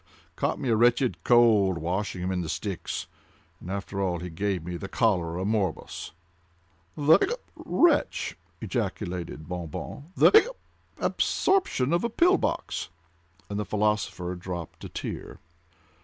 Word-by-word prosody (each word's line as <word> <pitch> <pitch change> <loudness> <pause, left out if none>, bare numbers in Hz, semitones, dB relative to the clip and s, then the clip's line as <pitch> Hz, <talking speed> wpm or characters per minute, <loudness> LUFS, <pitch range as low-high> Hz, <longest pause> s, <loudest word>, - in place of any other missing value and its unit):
ugh!—caught - - -4
a 115 -3 +3
wretched 120 -5 +3
cold 110 -6 +5
washing 90 +3 -2
him 95 - -1
in 90 -1 -1
the 80 - -4
Styx—and 85 -2 -6
after 100 0 -3
all 90 -3 0
he 90 0 -6
gave 95 0 -1
me 90 0 -4
the 95 - -5
cholera 95 -5 +1
morbus." 100 -5 -2 0.9
"The—hiccup!—wretch!" 295 - +2 0.3
ejaculated 90 - -3
Bon 90 -1 -4
Bon, 140 - -7
"the—hic 425 -1 +7 0.5
cup!—abortion 265 - +1
of 170 - +2
a 235 - +1
pill 355 - +4
box!"—and 85 +4 -5
the - - 0
philosopher 105 -4 0
dropped 90 -2 -7
a - - -6
tear. - - -6
95 Hz, 120 wpm, -27 LUFS, 90-120 Hz, 0.9 s, the—hic